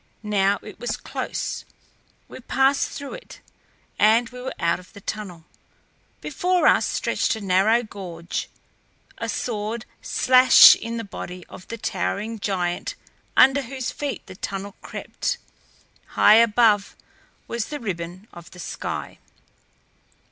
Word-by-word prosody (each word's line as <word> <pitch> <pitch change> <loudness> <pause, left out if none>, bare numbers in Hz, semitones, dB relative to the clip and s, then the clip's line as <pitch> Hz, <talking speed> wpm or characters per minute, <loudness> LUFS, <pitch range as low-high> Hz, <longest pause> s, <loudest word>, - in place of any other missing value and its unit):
Now 200 -1 +2
it 210 - -11
was 240 - -3
close; - - -4 0.6
we - - -10
passed 270 +2 +2
through 280 -1 -7
it - - -11 0.6
and 225 +3 +5
were 250 +1 -6
out 170 -1 +1
of 180 - -17
the 200 - -12
tunnel. 190 -6 -6 0.8
Before 360 +4 0
us - - +5
stretched 260 - 0
a - - -6
narrow 200 +5 +3
gorge, 180 -6 -6 0.7
a - - -3
sword 220 0 -3 0.2
slash 255 0 +7
in 230 0 -5
the 230 - -3
body 180 -3 -8
of 185 - -12
the 230 - -6
towering 220 0 -3
giant 185 - -2 0.4
under 270 +2 +6
whose 260 -1 -5
feet 290 -2 -5
the 185 - -11
tunnel 195 +1 -5
crept. - - -4 0.8
High 215 - +7
above 225 -2 +4 0.5
was 235 -2 -2
the 295 - -5
ribbon 185 -2 -5
of 170 -1 -12
the 180 - -14
sky. - - -5
215 Hz, 130 wpm, -23 LUFS, 190-245 Hz, 0.8 s, slash